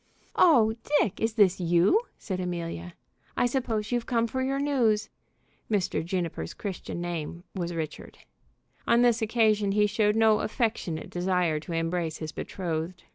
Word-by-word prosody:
"Oh, 235 -11 +5 0.3
Dick, 205 -3 0
is 225 0 +1
this 200 -5 +4
you?" 175 - +3 0.2
said 190 -3 -4
Amelia. 170 - -4 0.4
"I - - +3
suppose 235 -4 -1
you've 240 -1 -1
come 230 -2 +2
for 260 +3 -3
your 270 +1 0
news." 245 -7 +1 0.6
(Mr. 200 -6 0
Juniper's 170 - -3
Christian 190 -3 -5
name 170 -1 -4
was 175 -3 -3
Richard.) 155 -2 -6 0.7
On 235 +1 +5
this 235 -1 +3
occasion 215 -3 +2
he 210 0 +4
showed 210 0 +2
no 220 -1 +4
affectionate 215 - -2
desire 180 -3 +1
to 170 +3 -7
embrace 165 -1 -1
his 155 -1 -5
betrothed. 170 +1 -4
195 Hz, 145 wpm, -27 LUFS, 170-225 Hz, 0.7 s, Oh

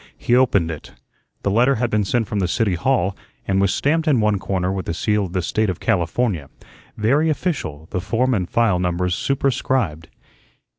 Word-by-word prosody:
He 120 - +1
opened 100 -10 +3
it. 80 - -9 0.5
The 100 - +1
letter 125 +6 +3
had 120 0 -1
been 105 -1 +1
sent 115 +2 0
from 105 - -2
the 95 - +1
City 105 +1 +1
Hall 100 0 +1 0.3
and 95 0 +2
was 100 -1 +2
stamped 160 +3 +1
in 140 -6 +4
one 105 -2 +2
corner 95 -1 -1
with 95 -2 -4
the 85 - -2
seal 105 +2 +1
of 90 - -8
the 90 -2 -1
State 110 +4 0
of 90 - -3
California, 90 - 0 0.5
very 140 +9 +2
official; 135 - -3
the 90 - -2
form 120 +7 0
and 90 -6 -1
file 115 -6 +2
numbers 90 0 0
superscribed. 130 - -1
105 Hz, 190 wpm, -21 LUFS, 90-125 Hz, 0.5 s, in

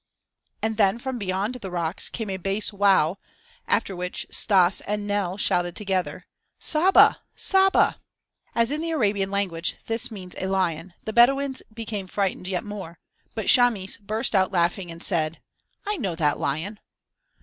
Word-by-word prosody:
And 220 -1 -1
then 200 0 +3
from 255 0 -4
beyond 195 +3 -1
the 225 -7 -7
rocks 170 -1 -2
came 220 -4 -4
a 190 - -2
bass 195 +3 -2
"wow" 195 -3 +3 0.5
after 195 - 0
which 180 0 -4
Stas 190 -3 +3
and 210 0 -2
Nell 200 -2 -1
shouted 175 -4 +1
together: 190 -3 -2 0.3
"Saba! 345 +5 +5
Saba!" 385 0 +3 0.6
As 230 +2 +2
in 300 +2 -1
the 330 - -3
Arabian 205 -10 +1
language 185 -4 -1
this 225 0 0
means 185 -5 -9
a 190 - -2
lion, 180 -2 -1
the 220 - -4
Bedouins 270 +3 +4
became 220 -3 -5
frightened 190 -1 -2
yet 185 +1 -2
more, 195 -6 -7 0.4
but - - -3
Chamis 230 -7 +3
burst 215 +4 -2
out 190 -2 +3
laughing 175 0 0
and 165 0 -8
said: 165 -3 0 0.5
"I 415 0 -1
know 195 - -2
that 150 -3 +1
lion." 160 +10 -2
195 Hz, 155 wpm, -25 LUFS, 180-225 Hz, 0.6 s, Saba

